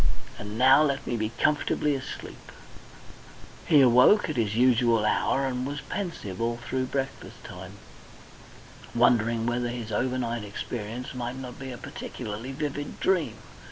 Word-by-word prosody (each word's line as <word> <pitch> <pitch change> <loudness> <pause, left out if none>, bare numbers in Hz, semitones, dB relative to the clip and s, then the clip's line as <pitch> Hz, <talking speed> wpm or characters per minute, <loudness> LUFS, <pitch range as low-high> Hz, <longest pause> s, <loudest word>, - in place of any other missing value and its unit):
"And 105 +1 -6
now 130 +4 +7
let 140 -2 +1
me - - -1
be 110 -1 -1
comfortably 150 0 +1
asleep..." 135 -1 -7 1.2
He 150 -3 +6
awoke 130 - +6
at - - -5
his 110 -4 0
usual 120 -2 +4
hour 135 +5 +2
and 125 -1 -2
was 140 +2 -4
pensive 165 - -5
all 115 0 0
through 130 +2 -2
breakfast 135 +1 -5
time, - - -9 1.2
wondering 115 -1 +3
whether 120 0 0
his 120 -2 -5
over 125 +4 0
night 120 -2 -2
experience 110 +4 -5
might 125 0 -4
not 125 -2 -8
be 135 -1 -6
a 125 - -7
particularly 115 0 -6
vivid 145 0 -4
dream. 185 -5 +1
125 Hz, 145 wpm, -27 LUFS, 115-135 Hz, 1.2 s, now